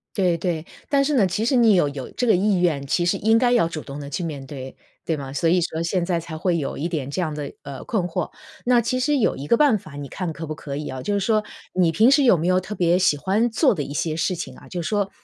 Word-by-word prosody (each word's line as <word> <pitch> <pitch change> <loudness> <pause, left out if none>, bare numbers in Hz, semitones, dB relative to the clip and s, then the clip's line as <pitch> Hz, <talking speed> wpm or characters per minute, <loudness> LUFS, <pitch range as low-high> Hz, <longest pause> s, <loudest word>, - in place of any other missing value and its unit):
对 180 -4 +2
对， 165 -2 -2 0.3
但 275 -1 +3
是 295 +1 0
呢， 225 -7 +4
其 185 +4 -1
实 255 +3 +2
你 230 -4 +5
有 175 -6 +3
有 140 -2 -6
这 250 - -2
个 220 - +5
意 195 +1 +2
愿， 155 -6 +1
其 175 +5 +1
实 175 - +1
应 220 +2 +3
该 245 0 +3
要 235 -9 +4
主 155 -2 -5
动 140 +1 -8
地 140 - -7
去 175 - -3
面 145 -5 -5
对， 130 -1 -8 0.3
对 160 -2 -1
吗？ 135 -1 -7
所 165 +4 +1
以 180 - +4
说 165 -1 -2
现 170 +1 0
在 175 -2 0
才 160 -1 -7
会 175 +1 +1
有 145 - -3
一 160 - -2
点 150 -6 -3
这 145 - -4
样 160 -4 -1
的， 150 -1 -5
呃， 140 -1 -8
困 215 -6 -1
惑。 175 - -3 0.4
那 245 -1 +5
其 255 +2 -1
实 290 +2 +2
有 230 - +2
一 140 - -7
个 235 - +4
办 260 -8 +4
法 155 -4 -13
你 145 -1 -6
看 175 +3 -4
可 160 +1 -6
不 155 - -4
可 145 -2 -7
以 150 +1 -4
啊。 130 -1 -5
就 205 +9 -1
是 - - +1
说， 215 +2 +1 0.3
你 180 -3 +3
平 225 - +5
时 280 0 +5
有 235 -9 +5
没 160 - -2
有 185 +1 +3
特 190 +3 -7
别 175 0 +2
喜 165 -6 +3
欢 205 +10 +1
做 245 +3 +3
的 155 - -3
一 140 - -5
些 155 +2 -1
事 175 +3 0
情 175 - -6
啊 - - -15
就 175 -2 -4
说 200 +3 0
175 Hz, 315 characters per minute, -23 LUFS, 155-215 Hz, 0.4 s, 你